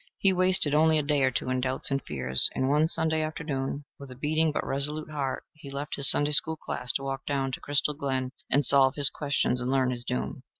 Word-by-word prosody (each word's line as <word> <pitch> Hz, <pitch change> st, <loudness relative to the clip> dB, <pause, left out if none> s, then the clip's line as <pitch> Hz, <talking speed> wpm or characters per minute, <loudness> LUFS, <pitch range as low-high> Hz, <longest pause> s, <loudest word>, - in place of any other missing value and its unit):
He 195 Hz, -1 st, +2 dB
wasted 185 Hz, -5 st, +3 dB
only 160 Hz, +1 st, +3 dB
a 150 Hz, -, 0 dB
day 145 Hz, -1 st, 0 dB
or 130 Hz, -, +3 dB
two 130 Hz, 0 st, -4 dB
in 130 Hz, 0 st, -1 dB
doubts 130 Hz, +2 st, -2 dB
and 135 Hz, 0 st, -1 dB
fears, 65 Hz, 0 st, +6 dB
and 130 Hz, -, -1 dB
one 150 Hz, +3 st, +2 dB
Sunday 160 Hz, -1 st, -1 dB
afternoon, 145 Hz, -3 st, -5 dB
with 140 Hz, -1 st, -11 dB
a 125 Hz, -, -10 dB
beating 155 Hz, +4 st, -1 dB
but -, -, -4 dB
resolute 150 Hz, +3 st, -1 dB
heart, 140 Hz, -3 st, -4 dB
he 155 Hz, -2 st, -13 dB
left 140 Hz, +2 st, -6 dB
his 140 Hz, -1 st, +3 dB
Sunday 145 Hz, +1 st, +2 dB
school 160 Hz, +2 st, +3 dB
class 125 Hz, -4 st, -4 dB
to 135 Hz, -, -3 dB
walk 135 Hz, 0 st, -5 dB
down 135 Hz, -2 st, -2 dB
to -, -, -6 dB
Crystal 145 Hz, +1 st, -1 dB
Glen 130 Hz, -2 st, -4 dB, 0.2 s
and 140 Hz, +1 st, +1 dB
solve 135 Hz, 0 st, +4 dB
his 145 Hz, -2 st, +3 dB
questions 135 Hz, -4 st, -2 dB
and 125 Hz, -, -3 dB
learn 130 Hz, -1 st, 0 dB
his 120 Hz, -1 st, -5 dB
doom. 65 Hz, -, -5 dB
140 Hz, 230 wpm, -26 LUFS, 130-150 Hz, 0.2 s, fears